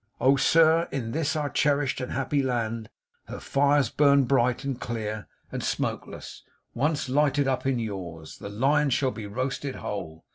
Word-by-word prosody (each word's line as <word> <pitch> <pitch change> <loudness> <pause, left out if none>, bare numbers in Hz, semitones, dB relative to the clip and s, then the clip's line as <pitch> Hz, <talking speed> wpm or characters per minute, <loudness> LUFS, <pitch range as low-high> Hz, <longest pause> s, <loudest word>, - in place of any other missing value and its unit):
Oh, 135 +3 +5
sir, 165 +3 +4
in 120 -5 -3
this 155 +2 -1
our 150 -2 0
cherished 145 -2 +1
and 125 - -4
our - - -2
happy 140 +1 +1
land, 115 -4 -2 0.4
her - - -7
fires 140 -2 +2
burn 140 -1 +5
bright 125 0 +2
and 135 -3 -3
clear 110 -3 -4 0.2
and - - -4
smokeless; - - -4 0.3
once 145 +3 0
lighted 145 +1 +2
up 135 0 0
in 135 -2 +1
yours, 90 -8 -6
the 100 - -7
lion 140 +7 +2
shall 130 0 +1
be 110 -4 -7
roasted 130 +5 -3
whole. 80 -6 -6
130 Hz, 170 wpm, -26 LUFS, 115-145 Hz, 0.4 s, Oh